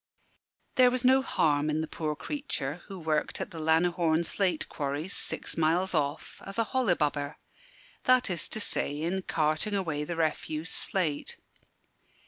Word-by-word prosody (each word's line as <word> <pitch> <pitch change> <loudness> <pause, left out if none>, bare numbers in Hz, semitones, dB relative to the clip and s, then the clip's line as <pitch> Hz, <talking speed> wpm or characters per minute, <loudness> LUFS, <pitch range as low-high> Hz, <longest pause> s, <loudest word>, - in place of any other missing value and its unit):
There 255 -1 +7
was 250 0 -1
no 260 +1 +6
harm 150 - +1
in 155 +1 0
the 160 - -3
poor 155 -1 -3
creature, 175 - -4
who 195 - -7
worked 155 -3 -1
at - - -4
the 165 - -7
Lanihorne 165 +1 +2
slate 180 -1 0
quarries, 145 +6 -3
six - - 0
miles 170 +4 +2
off, 145 -1 -2
as 195 - -8
a 230 - +2
"hollibubber" 155 - 0 0.7
that 255 -1 +5
is 175 -5 -1
to - - -2
say, 145 -7 +1
in 175 +4 -1
carting 155 +4 0
away 160 -7 -1
the 170 +3 -4
refuse 155 0 -2
slate. 170 -8 0
165 Hz, 150 wpm, -29 LUFS, 150-195 Hz, 0.7 s, There